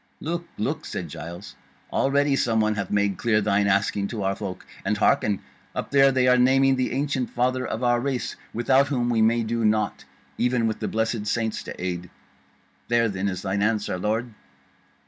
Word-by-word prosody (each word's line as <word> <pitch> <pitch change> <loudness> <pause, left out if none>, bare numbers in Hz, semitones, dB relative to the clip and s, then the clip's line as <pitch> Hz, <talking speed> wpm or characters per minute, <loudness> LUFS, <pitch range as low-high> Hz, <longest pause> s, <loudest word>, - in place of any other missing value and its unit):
"Look, 170 +3 -4
look," - - -2
said - - -5
Giles, 85 +5 -8 0.4
"already 140 +1 +2
some 115 -4 +1
one 110 0 +2
hath 100 -2 -3
made 100 -2 +1
clear 110 -3 +2
thine 100 -1 +2
asking 100 0 +1
to 110 -3 -4
our 95 0 0
folk; 95 -3 -6 0.2
and 105 +2 0
hearken! 105 -1 +2 0.3
up - - -4
there 135 -1 +6
they 130 -1 +2
are 125 0 +5
naming 135 +1 +4
the 130 -1 -1
ancient 135 -1 -1
Father 130 +1 0
of 115 - -4
our 120 -1 +3
Race, 130 0 -2 0.2
without 130 +4 +3
whom 120 -4 0
we 115 -2 +2
may 115 +1 +3
do 115 +1 -1
nought, 110 0 +1 0.3
even 125 -1 +2
with 110 -1 -1
the - - -2
blessed 110 -1 -1
saints 110 0 -1
to - - -8
aid. 90 -1 -4 0.8
There 115 -1 +2
then 95 0 -2
is 95 -2 -3
thine 100 0 -1
answer, 105 -3 0
lord." 110 +4 -1
115 Hz, 185 wpm, -25 LUFS, 100-125 Hz, 0.8 s, there